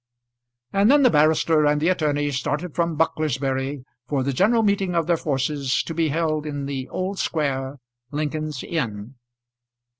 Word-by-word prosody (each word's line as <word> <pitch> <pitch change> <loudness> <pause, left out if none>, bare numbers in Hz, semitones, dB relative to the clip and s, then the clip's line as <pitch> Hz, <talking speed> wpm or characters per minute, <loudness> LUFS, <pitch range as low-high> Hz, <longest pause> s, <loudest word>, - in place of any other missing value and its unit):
And 200 +2 +4
then 285 +1 +6
the 250 - +6
barrister 155 0 +3
and 150 0 +2
the 160 +4 +2
attorney 145 -5 0
started 145 +5 -2
from 170 -2 -1
Bucklersbury 135 -3 -1 0.2
for 140 -3 0
the 140 +1 -1
general 220 - +3
meeting 195 -3 +1
of 165 -1 +2
their 170 +1 +2
forces 140 -2 -1
to 165 - -5
be 165 0 +1
held 155 0 -1
in 145 -2 -4
the 135 -2 -4
Old 190 +1 -3
Square, 140 -3 -1 0.3
Lincoln's 150 -1 -3
Inn. 115 -7 -3
150 Hz, 155 wpm, -23 LUFS, 140-170 Hz, 0.3 s, then